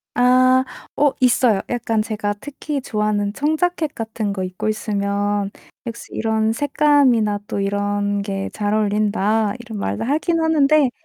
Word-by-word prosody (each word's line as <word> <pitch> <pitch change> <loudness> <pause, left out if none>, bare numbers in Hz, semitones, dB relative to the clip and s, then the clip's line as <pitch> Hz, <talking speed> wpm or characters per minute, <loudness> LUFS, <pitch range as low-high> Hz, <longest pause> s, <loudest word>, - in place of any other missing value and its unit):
아 255 +1 +4 0.3
어 290 -1 +4
있어요. 240 -4 +3
약간 225 -3 0
제가 210 -2 -2
특히 290 0 -5
좋아하는 210 -3 -1
청자켓 315 +3 0
같은 220 -2 -3
거 190 -1 -3
입고 185 +3 -4
있으면 205 -1 -1 0.4
'역시 230 - -7
이런 220 0 +1
색감이나 270 -7 +2
또 200 - -3
이런 205 0 -1
게 195 -1 -4
잘 205 0 -1
어울린다.' 210 0 +1
이런 220 -3 -7
말도 100 - -2
하긴 320 +5 0
하는데 305 -3 +3
220 Hz, 280 characters per minute, -20 LUFS, 205-260 Hz, 0.4 s, 아